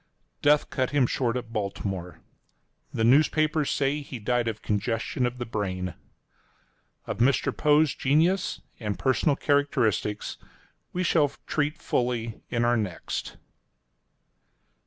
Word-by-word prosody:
Death 150 +1 +3
cut 130 -2 0
him 145 -3 +3
short 120 0 0
at 115 -2 -7
Baltimore. 95 -4 -4 0.7
The 115 - -1
newspapers 155 +4 +3
say 140 +1 0
he 140 -2 -7
died 120 +2 0
of 110 -1 -4
congestion 115 +4 0
of 120 +1 -5
the 120 - -4
brain. 95 -5 -3 1.1
Of - - -4
Mr. 130 +3 +2
Poe's 150 0 +4
genius 165 +8 +1 0.2
and 105 -3 -3
personal 140 +2 +2
characteristics 125 -8 0 0.5
we 180 - -1
shall 155 -4 +3 0.2
treat 150 +1 -1
fully 120 -7 -2
in 120 -1 +1
our 120 0 +3
next. 100 -6 -4
125 Hz, 120 wpm, -27 LUFS, 110-145 Hz, 1.1 s, Poe's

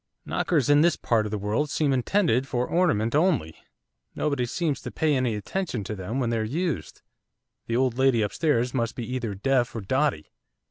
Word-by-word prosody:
'Knockers 150 -8 0
in 145 0 +5
this 170 0 +4
part 110 -2 0
of - - -7
the 105 - -1
world 105 +9 -1
seem 145 -1 +1
intended 135 - +1
for 125 -1 -1
ornament 155 - +1
only, 150 - +2 0.6
nobody 140 -5 0
seems 155 +2 -1
to - - -6
pay 155 -2 +1
any 125 -4 0
attention 125 - -3
to 105 - -5
them 105 +7 -4
when 120 -3 0
they're 115 -1 0
used. 140 - -3 0.6
The 115 - -1
old 130 0 +1
lady 130 -4 +4
upstairs 125 +2 0
must 115 -3 -1
be 120 - -4
either 120 -6 -3
deaf 125 +4 +1
or 115 - -3
dotty. 130 - 0
125 Hz, 185 wpm, -26 LUFS, 110-150 Hz, 0.6 s, in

